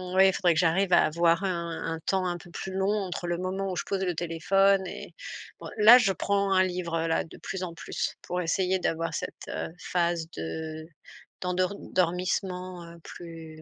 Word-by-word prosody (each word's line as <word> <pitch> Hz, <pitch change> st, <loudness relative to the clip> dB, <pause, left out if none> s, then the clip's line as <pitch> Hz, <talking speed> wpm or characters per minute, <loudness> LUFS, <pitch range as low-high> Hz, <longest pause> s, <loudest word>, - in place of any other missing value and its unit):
oui, 190 Hz, +1 st, +7 dB
il 190 Hz, -, +3 dB
faudrait 175 Hz, -2 st, +3 dB
que 160 Hz, -, +1 dB
j'arrive 180 Hz, +2 st, +3 dB
à -, -, +7 dB
avoir 170 Hz, +3 st, +2 dB
un 170 Hz, -3 st, -2 dB
un 160 Hz, -, -8 dB
temps 190 Hz, -1 st, +1 dB
un 175 Hz, -1 st, -2 dB
peu 175 Hz, +1 st, -14 dB
plus 190 Hz, +2 st, -6 dB
long 190 Hz, +1 st, +1 dB
entre 190 Hz, -4 st, -3 dB
le 175 Hz, 0 st, -1 dB
moment 190 Hz, +1 st, -2 dB
où -, -, -3 dB
je -, -, -2 dB
pose 195 Hz, -1 st, -1 dB
le 180 Hz, -2 st, 0 dB
téléphone 190 Hz, +4 st, +2 dB
et -, -, -8 dB, 0.4 s
bon -, -, -8 dB
là, 220 Hz, +3 st, +10 dB
je 220 Hz, -6 st, +3 dB
prends 200 Hz, 0 st, 0 dB
un 185 Hz, -, +5 dB
livre-là, 170 Hz, -3 st, -1 dB
de -, -, -13 dB
plus 190 Hz, -1 st, -5 dB
en 170 Hz, -2 st, -4 dB
plus -, -, -3 dB
pour 180 Hz, -, -3 dB
essayer 185 Hz, +2 st, +1 dB
d'avoir 165 Hz, -3 st, -1 dB
cette, -, -, -6 dB
heu, -, -, -4 dB
phase 170 Hz, -2 st, 0 dB
de 155 Hz, -, -5 dB, 0.6 s
d'endor 185 Hz, +1 st, 0 dB
dormissement, 180 Hz, 0 st, -1 dB
heu, 170 Hz, 0 st, -12 dB
plus, 165 Hz, -2 st, -10 dB
180 Hz, 195 wpm, -28 LUFS, 165-190 Hz, 0.6 s, là